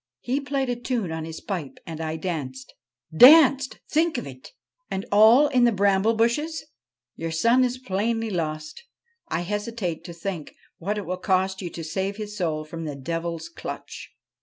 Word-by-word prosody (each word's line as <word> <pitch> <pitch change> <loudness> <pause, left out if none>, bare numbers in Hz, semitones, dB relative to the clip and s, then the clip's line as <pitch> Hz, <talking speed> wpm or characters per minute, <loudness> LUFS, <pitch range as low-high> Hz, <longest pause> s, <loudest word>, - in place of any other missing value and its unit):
He 265 +4 -1
played 275 -1 -1
a 245 - -1
tune 240 -7 -2
on 160 0 -4
his 160 0 -8
pipe 175 -9 -5
and 160 -1 -6
I 160 0 -3
danced 145 -7 -5 0.4
danced! 270 - +7
think 320 +1 +1
of - - -4
it! - - -11 0.4
And 195 - -3
all 220 +7 +7
in 250 -2 +3
the 240 - +5
bramble 200 +2 +2
bushes 295 +9 0
I - - -28 0.5
Your 165 0 -4
son 230 +10 +3
is 250 0 0
plainly 225 0 -1
lost; 155 - -4 0.5
I - - -1
hesitate 205 -2 -3
to 170 - -7
think 170 -2 -6 0.2
what 205 +5 -2
it 205 - -4
will 185 +2 -3
cost 190 0 0
you 175 - -4
to 165 - -7
save 190 +5 -3
his 210 -1 -6
soul 160 -5 -2
from 165 +1 -7
the 150 -2 -4
devil's 165 +3 -4
clutch.' 170 - -8
195 Hz, 180 wpm, -25 LUFS, 165-235 Hz, 0.5 s, danced